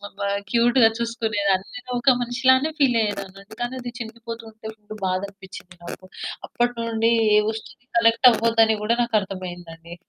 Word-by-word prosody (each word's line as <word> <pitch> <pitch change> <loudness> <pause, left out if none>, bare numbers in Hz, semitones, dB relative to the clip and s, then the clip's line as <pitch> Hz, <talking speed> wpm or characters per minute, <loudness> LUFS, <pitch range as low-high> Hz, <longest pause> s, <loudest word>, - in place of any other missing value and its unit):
అబ్బా 200 0 -4 0.2
క్యూట్‌గా 235 0 +5
చూసుకునేదాన్ని 215 -5 -1
నేనొక 245 +1 +1
మనిషి 245 +1 -4
లానే 260 +4 +5
ఫీలయ్యేదాన్ని. 205 -7 0
అందుకనే 240 +5 -6
అది 245 -1 -6
చినిగిపోతుంటే 230 -1 -9
అప్పుడు 215 -1 -12
బాధ 185 0 0
అనిపిచ్చింది 190 -2 -13
నాకు. 180 - -8 0.4
అప్పట్నుండి 230 -2 0 0.3
ఏ - - +7
వస్తువుకి 220 +2 -7
కనెక్టవ్వద్దని 230 -1 +4
గూడా 230 +2 +1
నాకర్థమయిందండి. 180 -6 -4
225 Hz, 120 wpm, -23 LUFS, 200-240 Hz, 0.4 s, ఏ